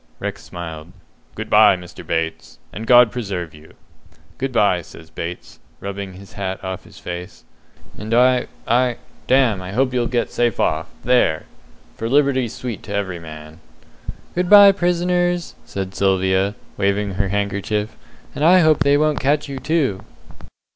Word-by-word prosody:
Rex -, -, -5 dB
smiled. 80 Hz, -3 st, -8 dB, 0.4 s
"Good -, -, -5 dB
bye, 105 Hz, -2 st, +6 dB
Mr. 90 Hz, -1 st, -11 dB
Bates, 80 Hz, 0 st, -3 dB, 0.2 s
and 110 Hz, +1 st, -7 dB
God 120 Hz, -2 st, +7 dB
preserve 95 Hz, -9 st, -4 dB
you!" 75 Hz, +1 st, -16 dB, 0.6 s
"Good 135 Hz, 0 st, -2 dB
bye," 100 Hz, -7 st, +2 dB
says 80 Hz, 0 st, -14 dB
Bates, 85 Hz, +1 st, -7 dB, 0.2 s
rubbing 100 Hz, -1 st, -6 dB
his 95 Hz, +2 st, -13 dB
hat 95 Hz, -1 st, -4 dB
off 95 Hz, -1 st, -5 dB
his -, -, -16 dB
face, 90 Hz, +2 st, -8 dB, 0.6 s
"and 105 Hz, +2 st, -6 dB
I 125 Hz, +1 st, +4 dB, 0.2 s
I 125 Hz, 0 st, +2 dB, 0.3 s
damme, 125 Hz, -7 st, +3 dB
I 90 Hz, +1 st, -7 dB
hope 130 Hz, +3 st, +1 dB
you'll 120 Hz, -2 st, +1 dB
get 120 Hz, -1 st, -1 dB
safe 120 Hz, -3 st, 0 dB
off -, -, 0 dB, 0.2 s
there! 125 Hz, -11 st, +2 dB, 0.5 s
for 115 Hz, -, -3 dB
liberty's 135 Hz, -4 st, +2 dB
sweet 120 Hz, -5 st, -5 dB
to 100 Hz, -, -3 dB
every 95 Hz, -4 st, -2 dB
man." 80 Hz, 0 st, -11 dB, 0.7 s
"Good 180 Hz, 0 st, -1 dB
bye, 205 Hz, -1 st, +10 dB
prisoners!" 175 Hz, -1 st, 0 dB
says 95 Hz, -1 st, -4 dB
Sylvia, 95 Hz, +1 st, +1 dB, 0.2 s
waving 100 Hz, 0 st, 0 dB
her 100 Hz, +1 st, 0 dB
handkerchief; 100 Hz, +2 st, -2 dB, 0.4 s
"and 145 Hz, -, -3 dB
I 180 Hz, +3 st, +6 dB
hope 155 Hz, -2 st, +4 dB
they 140 Hz, 0 st, +4 dB
won't 155 Hz, 0 st, +1 dB
catch 145 Hz, +3 st, +1 dB
you, 135 Hz, -1 st, -6 dB
too." 140 Hz, -, 0 dB
105 Hz, 155 wpm, -20 LUFS, 95-130 Hz, 0.7 s, bye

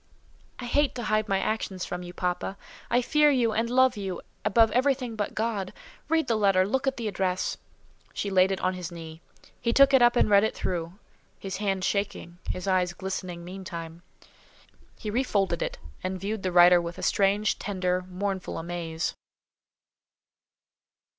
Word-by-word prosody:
"I 250 Hz, -, -6 dB
hate 285 Hz, +3 st, +1 dB
to 240 Hz, -, -4 dB
hide 215 Hz, 0 st, +1 dB
my 195 Hz, -1 st, +2 dB
actions 195 Hz, -3 st, -2 dB
from 180 Hz, -, -5 dB
you, 175 Hz, 0 st, -8 dB
papa. 180 Hz, +2 st, -3 dB, 0.3 s
I 245 Hz, +1 st, +2 dB
fear 300 Hz, +3 st, +4 dB
you 245 Hz, -5 st, +2 dB
and 225 Hz, +2 st, 0 dB
love 260 Hz, 0 st, +4 dB
you 195 Hz, -3 st, -4 dB, 0.2 s
above 225 Hz, +1 st, +4 dB
everything 255 Hz, -1 st, +1 dB
but 205 Hz, -2 st, -3 dB
God. 215 Hz, -3 st, -2 dB, 0.4 s
Read 325 Hz, -1 st, +2 dB
the 230 Hz, -, +2 dB
letter; 195 Hz, -3 st, +3 dB
look 265 Hz, +5 st, -1 dB
at 270 Hz, -, 0 dB
the 230 Hz, -2 st, -3 dB
address." 190 Hz, -2 st, -1 dB, 0.5 s
She 200 Hz, -, -3 dB
laid 190 Hz, 0 st, +4 dB
it 190 Hz, -, -1 dB
on 185 Hz, -, +1 dB
his 180 Hz, -2 st, -6 dB
knee. 165 Hz, -1 st, -9 dB, 0.4 s
He 235 Hz, -, 0 dB
took 275 Hz, +2 st, +6 dB
it 265 Hz, -, +6 dB
up 240 Hz, 0 st, +5 dB
and 240 Hz, -, +4 dB
read 200 Hz, -1 st, +5 dB
it 220 Hz, -, 0 dB
through; 170 Hz, -1 st, -3 dB, 0.4 s
his 190 Hz, -1 st, -5 dB
hand 195 Hz, -2 st, -1 dB
shaking, 200 Hz, -3 st, -2 dB
his 185 Hz, +2 st, -3 dB
eyes 180 Hz, -2 st, +2 dB
glistening 180 Hz, -2 st, -5 dB
meantime. 170 Hz, -3 st, -7 dB, 1.0 s
He 210 Hz, -, -5 dB
re 240 Hz, +5 st, +2 dB
folded 195 Hz, -8 st, 0 dB
it, -, -, -2 dB, 0.3 s
and 185 Hz, 0 st, -3 dB
viewed 205 Hz, +2 st, -3 dB
the 185 Hz, -, -1 dB
writer 175 Hz, 0 st, +7 dB
with 170 Hz, 0 st, -6 dB
a -, -, -7 dB
strange, 200 Hz, +1 st, +2 dB
tender, 185 Hz, -2 st, -1 dB
mournful 190 Hz, 0 st, -3 dB
amaze. 165 Hz, -1 st, -3 dB
195 Hz, 175 wpm, -27 LUFS, 180-225 Hz, 1.0 s, writer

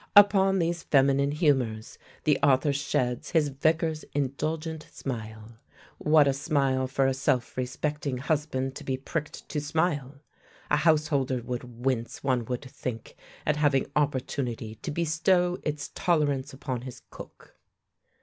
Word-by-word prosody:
Upon 195 Hz, -1 st, +7 dB
these 170 Hz, -1 st, 0 dB
feminine 140 Hz, -1 st, +3 dB
humours 130 Hz, -8 st, 0 dB, 0.2 s
the 150 Hz, -, +3 dB
author 140 Hz, +1 st, +4 dB
sheds 130 Hz, -3 st, -1 dB
his 155 Hz, -4 st, +2 dB
Vicar's 155 Hz, +3 st, 0 dB
indulgent 155 Hz, +3 st, -2 dB
smile. 110 Hz, -3 st, -7 dB, 0.4 s
What 150 Hz, -1 st, +5 dB
a 140 Hz, -, +3 dB
smile 135 Hz, -2 st, +1 dB
for 135 Hz, +1 st, +1 dB
a 135 Hz, -, +2 dB
self 130 Hz, -2 st, 0 dB
respecting 140 Hz, +2 st, -2 dB
husband 140 Hz, -2 st, -1 dB
to -, -, -9 dB
be 130 Hz, -1 st, -1 dB
pricked 150 Hz, +3 st, -5 dB
to 150 Hz, -, -2 dB
smile! 150 Hz, -3 st, -1 dB, 0.6 s
A 150 Hz, -, +5 dB
householder 150 Hz, -5 st, +2 dB
would 125 Hz, 0 st, -6 dB
wince, 120 Hz, -3 st, -1 dB
one 130 Hz, -4 st, +1 dB
would 125 Hz, +2 st, -3 dB
think, 125 Hz, -3 st, -6 dB, 0.3 s
at 150 Hz, -1 st, +1 dB
having 145 Hz, -3 st, +2 dB
opportunity 130 Hz, -5 st, -1 dB
to -, -, -4 dB
bestow 170 Hz, +3 st, +1 dB
its 150 Hz, -2 st, -4 dB
tolerance 145 Hz, -5 st, +1 dB
upon 130 Hz, -2 st, -4 dB
his 130 Hz, -1 st, -9 dB
cook. -, -, -12 dB
140 Hz, 135 wpm, -27 LUFS, 130-155 Hz, 0.6 s, Upon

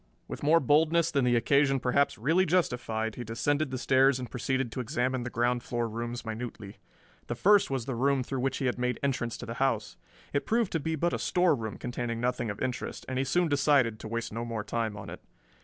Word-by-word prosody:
With -, -, -7 dB
more 155 Hz, +3 st, +5 dB
boldness 160 Hz, +4 st, +3 dB
than 140 Hz, -4 st, +2 dB
the 120 Hz, -1 st, +3 dB
occasion 135 Hz, +2 st, +3 dB
perhaps 130 Hz, +2 st, +1 dB
really 160 Hz, -, +2 dB
justified 120 Hz, -10 st, 0 dB
he 120 Hz, -, -6 dB
descended 145 Hz, +6 st, 0 dB
the 130 Hz, -, -3 dB
stairs 130 Hz, +1 st, +4 dB
and 125 Hz, -2 st, -7 dB
proceeded 130 Hz, 0 st, -1 dB
to 130 Hz, -, -5 dB
examine 125 Hz, +2 st, -1 dB
the 120 Hz, -, -4 dB
ground 120 Hz, +1 st, 0 dB
floor 120 Hz, -1 st, -2 dB
rooms 115 Hz, +1 st, -5 dB
minutely. 110 Hz, -3 st, -6 dB, 0.5 s
The -, -, -3 dB
first 205 Hz, 0 st, +4 dB
was 135 Hz, -4 st, -2 dB
the 135 Hz, -, -3 dB
room 135 Hz, +2 st, +1 dB
through 135 Hz, +1 st, -4 dB
which 130 Hz, +1 st, -1 dB
he 135 Hz, -, -2 dB
had 125 Hz, 0 st, -1 dB
made 125 Hz, -1 st, -1 dB
entrance 125 Hz, -4 st, -1 dB
to -, -, -7 dB
the 115 Hz, -, -5 dB
house. 115 Hz, -6 st, 0 dB, 0.4 s
It 140 Hz, -, -1 dB
proved 230 Hz, -2 st, +1 dB
to 165 Hz, -, 0 dB
be 160 Hz, +2 st, -2 dB
but 170 Hz, +3 st, 0 dB
a -, -, -1 dB
storeroom 145 Hz, -, +1 dB
containing 120 Hz, -1 st, -4 dB
nothing 120 Hz, -1 st, -1 dB
of 100 Hz, -, -5 dB
interest, 130 Hz, -1 st, -4 dB
and 130 Hz, 0 st, -2 dB
he -, -, +2 dB
soon 175 Hz, +6 st, +1 dB
decided 140 Hz, -6 st, +2 dB
to -, -, -7 dB
waste 115 Hz, 0 st, -4 dB
no 115 Hz, +1 st, -3 dB
more 115 Hz, -2 st, -4 dB
time 110 Hz, -1 st, -2 dB
on -, -, -8 dB
it. -, -, -9 dB
125 Hz, 225 wpm, -29 LUFS, 115-140 Hz, 0.5 s, more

